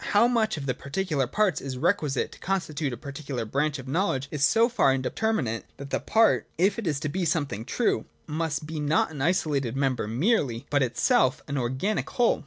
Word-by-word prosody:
How 230 Hz, +4 st, +6 dB
much 225 Hz, -6 st, +1 dB
of 140 Hz, -, -5 dB
the 130 Hz, -, 0 dB
particular 145 Hz, -2 st, -2 dB
parts 210 Hz, -, +1 dB
is 135 Hz, -2 st, -5 dB
requisite 150 Hz, -4 st, 0 dB
to -, -, -14 dB
con 195 Hz, +1 st, 0 dB
stitute 155 Hz, -4 st, -4 dB
a 120 Hz, -, -5 dB
particular 140 Hz, -2 st, -5 dB
branch 145 Hz, +6 st, 0 dB
of 135 Hz, -1 st, -9 dB
knowledge 135 Hz, -3 st, 0 dB
is 150 Hz, -2 st, -1 dB
so 225 Hz, +10 st, +5 dB
far 235 Hz, -, +3 dB
inde 130 Hz, -1 st, -2 dB
terminate, 175 Hz, -, 0 dB
that 140 Hz, 0 st, -9 dB
the -, -, +1 dB
part, 225 Hz, 0 st, +3 dB
if 195 Hz, +7 st, +2 dB
it 215 Hz, -, -4 dB
is 145 Hz, -3 st, 0 dB
to 155 Hz, -, -1 dB
be 180 Hz, +5 st, -2 dB
something 145 Hz, -, -1 dB
true, 230 Hz, -, 0 dB, 0.2 s
must 155 Hz, 0 st, -2 dB
be 155 Hz, 0 st, -5 dB
not 150 Hz, +2 st, +1 dB
an 145 Hz, -3 st, -6 dB
isolated 145 Hz, -6 st, +1 dB
member 130 Hz, -5 st, 0 dB
merely, 130 Hz, -, +1 dB
but 145 Hz, -1 st, +3 dB
itself 130 Hz, +1 st, +2 dB
an 145 Hz, -, -3 dB
organic 130 Hz, -, -1 dB
whole. 240 Hz, -2 st, +2 dB
145 Hz, 205 wpm, -26 LUFS, 135-185 Hz, 0.2 s, How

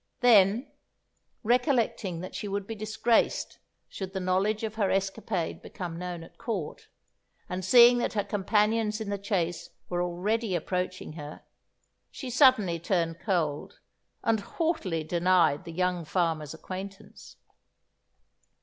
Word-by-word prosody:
Then, 220 Hz, 0 st, +5 dB, 0.8 s
recollecting 235 Hz, -, +1 dB
that 185 Hz, -, -7 dB
she 210 Hz, -, -4 dB
would 200 Hz, 0 st, -3 dB
be 225 Hz, -, -5 dB
disgraced 220 Hz, +2 st, 0 dB, 0.3 s
should 190 Hz, -1 st, -7 dB
the 190 Hz, -, -2 dB
knowledge 190 Hz, +4 st, 0 dB
of 220 Hz, -1 st, -2 dB
her 210 Hz, -3 st, 0 dB
escapade 195 Hz, -2 st, -2 dB
become 170 Hz, -2 st, -6 dB
known 180 Hz, -2 st, -5 dB
at -, -, -16 dB
Court, 205 Hz, -10 st, -4 dB, 0.6 s
and 180 Hz, +1 st, -4 dB
seeing 240 Hz, +5 st, +7 dB
that -, -, -1 dB
her 205 Hz, -2 st, 0 dB
companions 210 Hz, +2 st, +1 dB
in 215 Hz, -2 st, -4 dB
the 200 Hz, -, -2 dB
chase 180 Hz, -4 st, -2 dB, 0.2 s
were 175 Hz, 0 st, -1 dB
already 190 Hz, +4 st, -1 dB
approaching 180 Hz, 0 st, -3 dB
her, 150 Hz, -2 st, -9 dB, 0.7 s
she 260 Hz, -3 st, -7 dB
suddenly 230 Hz, -, +4 dB
turned 165 Hz, -1 st, -1 dB
cold, 160 Hz, -8 st, -2 dB, 0.4 s
and 225 Hz, -1 st, +2 dB
haughtily 205 Hz, -, -2 dB
denied 170 Hz, -2 st, +2 dB
the 165 Hz, -, -7 dB
young 180 Hz, 0 st, 0 dB
farmer's 160 Hz, -2 st, -1 dB
acquaintance. 190 Hz, +3 st, -9 dB
190 Hz, 130 wpm, -28 LUFS, 175-220 Hz, 0.8 s, seeing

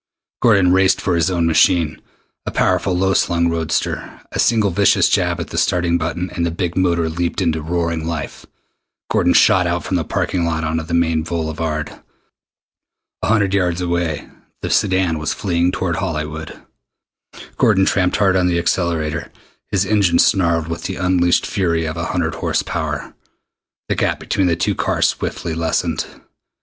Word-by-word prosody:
Gordon 100 Hz, -6 st, +4 dB
raced 95 Hz, 0 st, +3 dB
for 90 Hz, -, 0 dB
his 85 Hz, +1 st, +2 dB
own 85 Hz, -2 st, 0 dB
machine, 80 Hz, -1 st, +2 dB, 0.5 s
a -, -, +1 dB
powerful 90 Hz, -2 st, +1 dB
low 95 Hz, +1 st, +2 dB
slung 85 Hz, -2 st, +1 dB
roadster. 80 Hz, -1 st, -2 dB
A -, -, -4 dB
single 110 Hz, -4 st, +3 dB
vicious 100 Hz, +2 st, +3 dB
jab -, -, +1 dB
at -, -, -6 dB
the -, -, -1 dB
starting 85 Hz, -1 st, +1 dB
button, 85 Hz, +2 st, -3 dB
and 85 Hz, -, -3 dB
the 85 Hz, -, +1 dB
big 85 Hz, +1 st, -3 dB
motor 85 Hz, -3 st, +1 dB
leaped 85 Hz, +2 st, -2 dB
into 80 Hz, -1 st, 0 dB
roaring 85 Hz, 0 st, -2 dB
life. 80 Hz, -4 st, -5 dB, 0.6 s
Gordon -, -, +3 dB
shot 90 Hz, -1 st, +5 dB
out 85 Hz, 0 st, -1 dB
from 95 Hz, -, -1 dB
the 85 Hz, -, -1 dB
parking 90 Hz, +3 st, -1 dB
lot 80 Hz, -1 st, -1 dB
onto 80 Hz, +1 st, -1 dB
the 85 Hz, +1 st, -3 dB
main 80 Hz, -1 st, +1 dB
boulevard. 80 Hz, -2 st, -4 dB, 1.2 s
A -, -, -1 dB
hundred 100 Hz, -3 st, +2 dB
yards 90 Hz, -3 st, +1 dB
away 85 Hz, -3 st, -2 dB, 0.4 s
the -, -, -2 dB
sedan 95 Hz, -5 st, +1 dB
was 75 Hz, 0 st, -2 dB
fleeing 90 Hz, -3 st, 0 dB
toward 90 Hz, -2 st, -2 dB
Hollywood. 80 Hz, -3 st, -4 dB, 1.0 s
Gordon 95 Hz, -4 st, +3 dB
tramped 90 Hz, -2 st, +1 dB
hard 95 Hz, -2 st, +3 dB
on 90 Hz, -1 st, +2 dB
the 85 Hz, -1 st, +1 dB
accelerator. 85 Hz, -3 st, -1 dB, 0.4 s
His 100 Hz, -1 st, 0 dB
engine 95 Hz, -4 st, +2 dB
snarled 85 Hz, -5 st, +2 dB
with 85 Hz, 0 st, -5 dB
the 95 Hz, -, -3 dB
unleashed 90 Hz, -1 st, +2 dB
fury 85 Hz, -5 st, 0 dB
of 80 Hz, +1 st, -4 dB
a 85 Hz, 0 st, -3 dB
hundred 85 Hz, -3 st, -1 dB
horsepower. -, -, -3 dB, 0.7 s
The -, -, 0 dB
gap -, -, 0 dB
between 95 Hz, -2 st, 0 dB
the 85 Hz, -, +2 dB
two 90 Hz, -, 0 dB
cars -, -, +1 dB
swiftly 85 Hz, -, -4 dB
lessened. 80 Hz, 0 st, -1 dB
85 Hz, 165 wpm, -19 LUFS, 80-95 Hz, 1.2 s, shot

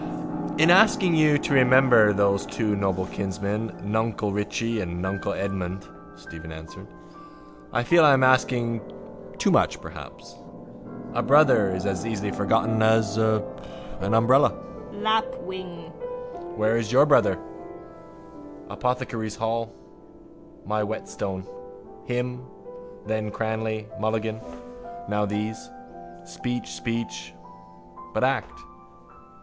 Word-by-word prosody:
—In 160 Hz, +3 st, +5 dB
asking 190 Hz, -2 st, +5 dB
you 155 Hz, -2 st, +4 dB
to 145 Hz, -, -2 dB
remember 130 Hz, -4 st, +6 dB
those 100 Hz, -1 st, +1 dB
two 105 Hz, -3 st, -1 dB
noble 95 Hz, -2 st, -1 dB
kinsmen 100 Hz, +3 st, -3 dB
nuncle 110 Hz, 0 st, -1 dB
Richie 110 Hz, +2 st, -2 dB
and 85 Hz, -2 st, -5 dB
nuncle 95 Hz, +2 st, -2 dB
Edmund, 95 Hz, -1 st, -4 dB, 0.3 s
Stephen 80 Hz, 0 st, -11 dB
answered, 80 Hz, 0 st, -11 dB, 0.8 s
I 120 Hz, -, 0 dB
feel 170 Hz, +6 st, +5 dB
I 145 Hz, -2 st, +7 dB
am 130 Hz, -1 st, +3 dB
asking 125 Hz, -3 st, +2 dB, 0.6 s
too -, -, +2 dB
much -, -, +2 dB
perhaps. -, -, -11 dB, 0.8 s
A -, -, 0 dB
brother 130 Hz, -10 st, +4 dB
is 95 Hz, -, -4 dB
as 95 Hz, -3 st, -1 dB
easily 105 Hz, -3 st, -3 dB
forgotten 110 Hz, +2 st, +1 dB
as 110 Hz, -1 st, +3 dB
an 110 Hz, -1 st, +2 dB, 0.7 s
umbrella. 130 Hz, +5 st, +4 dB, 0.4 s
Lapwing. 215 Hz, -4 st, -3 dB, 0.6 s
Where 110 Hz, -2 st, +2 dB
is 115 Hz, -1 st, -2 dB
your 135 Hz, +3 st, +6 dB
brother? 145 Hz, -2 st, +4 dB, 1.3 s
Apothecaries' 125 Hz, -4 st, -2 dB
hall. 115 Hz, 0 st, -2 dB, 0.9 s
My 105 Hz, +1 st, -1 dB
whetstone. 100 Hz, -2 st, -4 dB, 0.6 s
Him, 125 Hz, 0 st, -3 dB, 0.6 s
then 110 Hz, 0 st, -2 dB
Cranly, 110 Hz, 0 st, -3 dB
Mulligan: 110 Hz, 0 st, -2 dB, 0.7 s
now 105 Hz, 0 st, 0 dB
these. 105 Hz, -, -4 dB, 0.6 s
Speech, 120 Hz, +5 st, -5 dB
speech. 90 Hz, -2 st, -5 dB, 0.8 s
But -, -, +1 dB
act. -, -, -1 dB
110 Hz, 105 wpm, -25 LUFS, 100-125 Hz, 1.3 s, I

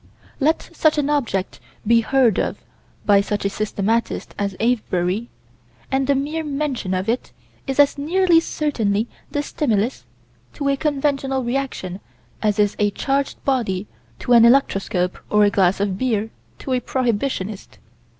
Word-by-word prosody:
Let 310 Hz, +3 st, +1 dB
such 310 Hz, -2 st, +2 dB
an 295 Hz, 0 st, +1 dB
object 225 Hz, -10 st, -1 dB, 0.3 s
be 230 Hz, +2 st, +5 dB
heard 245 Hz, -3 st, +3 dB
of -, -, -1 dB, 0.5 s
by 200 Hz, -1 st, +5 dB
such 205 Hz, 0 st, -3 dB
a -, -, +2 dB
systematist 215 Hz, +3 st, -1 dB
as 200 Hz, -2 st, -1 dB
Avebury, 215 Hz, -2 st, 0 dB, 0.6 s
and 265 Hz, 0 st, +1 dB
the 280 Hz, -, +3 dB
mere 300 Hz, +4 st, -2 dB
mention 275 Hz, -10 st, -2 dB
of 185 Hz, +2 st, -2 dB
it 235 Hz, +3 st, -1 dB, 0.4 s
is 270 Hz, +1 st, -2 dB
as 285 Hz, 0 st, +4 dB
nearly 345 Hz, +3 st, +4 dB
certainly 230 Hz, -10 st, -1 dB, 0.2 s
the 290 Hz, -, -2 dB
stimulus 235 Hz, -, -1 dB, 0.5 s
to 280 Hz, -1 st, -2 dB
a 275 Hz, -, +3 dB
conventional 275 Hz, -2 st, 0 dB
reaction 240 Hz, -7 st, -3 dB, 0.4 s
as 210 Hz, -1 st, +1 dB
is 205 Hz, -1 st, +2 dB
a 205 Hz, -1 st, +3 dB
charged 275 Hz, +6 st, -2 dB
body 220 Hz, -8 st, 0 dB, 0.3 s
to 245 Hz, -, 0 dB
an 235 Hz, -1 st, +8 dB
electroscope 195 Hz, -7 st, +2 dB
or 210 Hz, 0 st, +4 dB
a 205 Hz, -, +4 dB
glass 190 Hz, -1 st, +2 dB
of 195 Hz, -1 st, -1 dB
beer 225 Hz, -4 st, 0 dB, 0.3 s
to 265 Hz, -, -4 dB
a 250 Hz, -, +2 dB
prohibitionist. 225 Hz, -5 st, -2 dB
235 Hz, 150 wpm, -21 LUFS, 205-275 Hz, 0.6 s, an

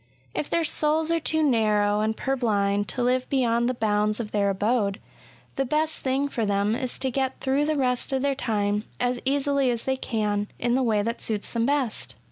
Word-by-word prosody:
If 295 Hz, -, -3 dB
their 335 Hz, -, +1 dB
souls 310 Hz, +1 st, +1 dB
are 335 Hz, -, +2 dB
too 315 Hz, 0 st, +1 dB
narrow 210 Hz, -6 st, +2 dB
and 220 Hz, +1 st, 0 dB
purblind 205 Hz, -6 st, 0 dB
to 245 Hz, -, -2 dB
live 255 Hz, +1 st, +1 dB
beyond 240 Hz, -3 st, +2 dB
the 255 Hz, -, -1 dB
bounds 210 Hz, -1 st, +1 dB
of 220 Hz, -3 st, -4 dB
their 200 Hz, -1 st, +1 dB
abode, 205 Hz, 0 st, 0 dB, 0.6 s
the 270 Hz, -, +2 dB
best 305 Hz, +4 st, 0 dB
thing 270 Hz, +2 st, 0 dB
for 245 Hz, -5 st, -2 dB
them 205 Hz, +1 st, +1 dB
is 255 Hz, -1 st, -2 dB
to 265 Hz, -, -1 dB
get 265 Hz, 0 st, -1 dB
through 275 Hz, +2 st, +1 dB
the 310 Hz, -1 st, 0 dB
rest 250 Hz, -2 st, 0 dB
of 265 Hz, 0 st, 0 dB
their 280 Hz, -1 st, +2 dB
time 210 Hz, -4 st, -1 dB
as 245 Hz, 0 st, 0 dB
easily 280 Hz, -1 st, +1 dB
as 235 Hz, -1 st, -2 dB
they 265 Hz, 0 st, 0 dB
can, 210 Hz, -4 st, -1 dB
in 240 Hz, -, 0 dB
the 260 Hz, -, +2 dB
way 220 Hz, -4 st, +2 dB
that 230 Hz, +2 st, -3 dB
suits 210 Hz, -2 st, -1 dB
them 230 Hz, 0 st, +1 dB
best. 280 Hz, -5 st, -1 dB
245 Hz, 205 wpm, -25 LUFS, 210-270 Hz, 0.6 s, are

